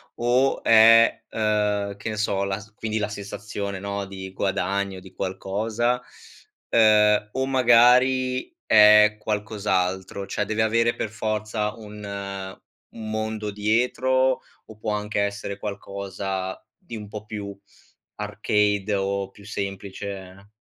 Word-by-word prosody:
O 125 +3 +1
è, 115 0 +6
uhm, 105 -2 0
che 105 - -5
ne 110 - -4
so 100 -2 0
la 100 0 -2
s 105 +1 -15
quindi 110 0 -3
la 105 -1 -1
sensazione 100 -1 -5
no, 100 0 -4
di 95 -1 -8
guadagno, 95 0 -1
di 95 0 -15
qualcosa? 110 +6 -1 0.7
Ehm, 105 -2 +4
o 130 +1 0
magari 130 0 +4
è 105 0 +7
qualcos'altro? 100 -3 -2
Cioè, 105 - -2
deve 110 +2 0
avere 115 +1 +2
per 110 - -3
forza 110 0 -2
un 100 -3 -7 0.3
un 110 -1 -7
mondo 110 -1 -3
dietro? 125 +5 +1 0.3
O 110 - -13
può 110 0 -2
anche 105 0 -1
essere 100 0 -3
qualcosa 100 -2 -5 0.2
di 175 - -10
un 105 - -8
po' 105 0 -8
più 100 -2 -6 0.6
arcade 105 0 0
o 100 0 -1
più 100 - -17
semplice? 100 -1 -6
105 Hz, 125 wpm, -24 LUFS, 100-110 Hz, 0.7 s, è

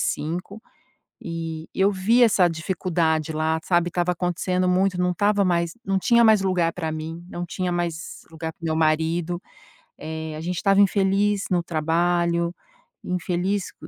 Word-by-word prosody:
5, 180 +7 -3 0.6
e 165 -1 -5
eu 195 +1 +3
vi 215 +6 +3
essa 205 -6 +5
dificuldade 160 -2 -1
lá, 155 +1 0
sabe, 175 -1 +2
tava 175 +1 0
acontecendo 180 +1 -1
muito, 185 0 +2
não 180 0 +2
tava 205 +1 +2
mais 170 -2 +1
não 195 0 +1
tinha 235 +4 +4
mais 215 -2 +6
lugar 180 -3 +1
pra 160 -3 -4
mim, 160 +2 -6
não 175 -1 -5
tinha 180 +1 -2
mais 170 -2 -4
lugar 160 0 -5
para 170 - -37
o - - -1
meu 160 0 0
marido, 160 +2 +1 0.6
eh, 160 0 -5
a - - -6
gente 175 +1 -3
tava 195 -1 +4
infeliz 200 +1 +2
no 175 -1 +2
trabalho, 170 +1 0 0.5
infeliz 180 +2 -2
co - - -13
175 Hz, 160 wpm, -23 LUFS, 165-190 Hz, 0.6 s, mais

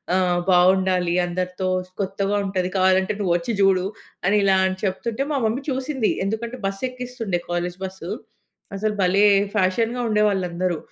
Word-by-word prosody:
ఆహ్, 180 -1 +2
బావుండాలి 185 -1 +3
అందరితో. 180 +1 -3 0.3
కొత్తగా 195 +1 -1
ఉంటది. 185 -2 -1
కావాలంటే 190 +1 +3
నువ్వొచ్చి 175 +3 0
జూడు" 190 -1 +3 0.4
అని 205 +2 +4
ఇలా 195 -1 +4 0.3
చెప్తుంటే 220 +6 -2
మా 290 - +1
మమ్మీ 230 +5 -1
చూసింది. 260 -3 -1
ఎందుకంటే 230 +4 -3
బస్సెక్కిస్తుండే 245 -2 -3
కాలేజు 175 +1 -2
బస్సు. 190 0 -7 0.7
అసలు 215 +1 -1
భలే! 195 +3 +4 0.3
ఫ్యాషన్‌గా 225 +5 +1
ఉండేవాళ్ళందరూ. 185 -5 +1
195 Hz, 120 wpm, -22 LUFS, 185-220 Hz, 0.7 s, అని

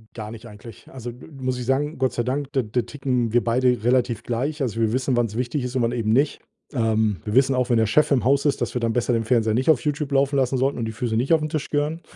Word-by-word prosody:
Gar 110 -1 -6
nicht 115 +1 -10
eigentlich. 105 0 -13
Also, 120 -2 -7 0.3
muss 130 -1 -2
ich 125 - -5
sagen, 145 +4 0
Gott 130 0 0
sei 120 - -1
Dank, 135 +3 -3
d 130 -3 +1
da 125 - +2
ticken 125 -5 -2
wir 120 - +3
beide 125 -1 +1
relativ 120 -2 +1
gleich. 140 +6 -2
Also, 115 -4 -2
wir 110 -1 +1
wissen, 130 -1 0
wann's 115 -3 0
wichtig 125 +2 -2
ist 125 +1 -5
und 130 - +1
wann 115 0 +1
eben 115 -3 -1
nicht. 140 +4 +2 0.3
Ähm 110 -5 +1
wir 105 - -3
wissen 135 +2 +4
auch, 125 -1 0
wenn 120 - +3
der 110 - +3
Chef 150 +8 +3
im 135 -3 +3
Haus 140 +3 +2
ist, 145 - +1
dass - - -2
wir 125 - -1
dann 115 -1 0
besser 120 0 0
den 115 - +1
Fernseher 110 -2 +2
nicht 130 +5 +1
auf 150 -6 +5
Youtube 150 -1 -2
laufen 140 +1 +2
lassen 130 0 +1
sollten 135 +2 0
und 115 - -2
die 110 - -3
Füße 110 0 -3
nicht 130 +7 +2
auf 160 - +4
'n 155 - -2
Tisch 155 -2 -3
gehören. 150 +3 -1
125 Hz, 280 wpm, -23 LUFS, 115-135 Hz, 0.3 s, auf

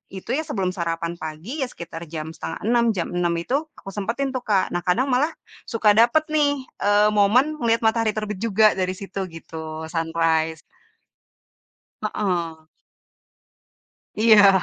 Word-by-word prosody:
itu 190 - -9
ya, 315 - -2
sebelum 195 - -1
sarapan 170 -1 -3
pagi 155 +5 -7
iya, 265 - +1
sekitar 170 -7 -8
jam 155 0 -4
05:30 235 +7 0
jam 175 -3 -3
06:00 175 -1 0
itu 250 +10 -1 0.2
aku 195 - -9
sempetin 230 +8 -2
tuh 260 -1 -3
Kak. 200 -3 +2
Nah, 175 0 -3
kadang 250 +10 +2
malah 290 +6 +2 0.3
suka 225 -2 +2
dapet 240 +7 +5
nih, 290 -3 +2 0.2
e - - -2 0.3
momen 250 +10 +4
ngeliat 230 -3 +1
matahari 220 -1 +2
terbit 210 -2 -4
juga 220 0 +2
dari 185 0 0
situ 195 0 -5
gitu, 165 0 -9 0.3
sunrise. 160 -1 0 1.4
Heeh. 170 -7 -2 1.5
Iya. 205 -4 +6
200 Hz, 140 wpm, -23 LUFS, 170-235 Hz, 1.5 s, Iya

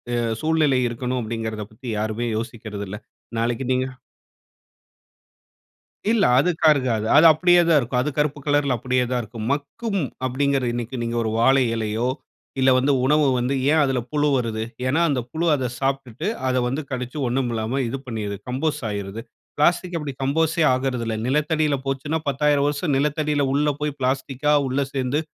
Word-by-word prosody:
அ - - +1 0.2
சூழ்நிலை 155 -4 +2
இருக்கணும் 125 +2 -3
அப்படிங்கிறத 110 -1 -4
பத்தி 125 +3 -12
யாருமே 110 +2 -2
யோசிக்கிறது 110 -3 -5
இல்ல. 105 - -5 0.4
நாளைக்கு 120 +2 -1
நீங்க 130 0 +1 2.3
இல்ல, 225 -3 +3
அதுக்கா 165 +1 +2
இருக்காது. 120 -6 -1
அது 155 - +7
அப்படியே 175 +2 +5
தான் 165 -2 +5
இருக்கும். 125 -1 -1
அது 150 - -1
கருப்பு 150 -1 0
கலர்‌ல 145 -3 +2
அப்படியே 125 +1 0
தான் 125 -1 +1
இருக்கும். 110 0 -7
மக்கும் 195 +8 -3 0.2
அப்படிங்கிறது 135 0 0
இன்னைக்கு 120 +1 -4
நீங்க 115 0 -3
ஒரு 110 - -1
வாழை 130 +3 +5
இலையோ 110 +2 -1 0.5
இல்ல 130 - +4
வந்து 135 +2 +2
உணவு 150 +2 +4
வந்து 125 +3 0 0.2
ஏன் 160 - +4
அதுல 135 -3 +1
புழு 150 0 +1
வருது? 115 -3 -1 0.2
ஏன்னா 145 +6 +2
அந்த 135 - +1
புழு 165 +2 -1
அதை 130 -3 -2
சாப்டுட்டு 135 - -2 0.2
அதை 130 0 +2
வந்து 135 +5 -2
கடுச்சு 125 +2 -4
ஒண்ணும் 125 0 0
இல்லாம 115 +4 -1
இது 130 - -3
பண்ணிடுது 105 -5 -4
கம்போஸ் 145 +4 -1
ஆயிடுது. 100 +1 -5 0.4
பிளாஸ்டிக் 175 +4 +2
அப்படி 150 -3 -4
கம்போஸ்‌ட் 160 +4 +1
ஆகறதில்ல 125 -4 -1
நிலத்தடியில 150 +2 +1
போச்சுன்னா 135 +3 -1
10000 145 +1 +2
வருசம் 145 +1 -1
நிலத்தடியில 150 0 0
உள்ள 150 +1 +2
போய் 150 -1 -2
பிளாஸ்டிக்‌கா 135 +2 0
உள்ள 130 +2 -1
சேர்ந்து 130 +2 0
135 Hz, 155 wpm, -23 LUFS, 120-150 Hz, 2.3 s, அது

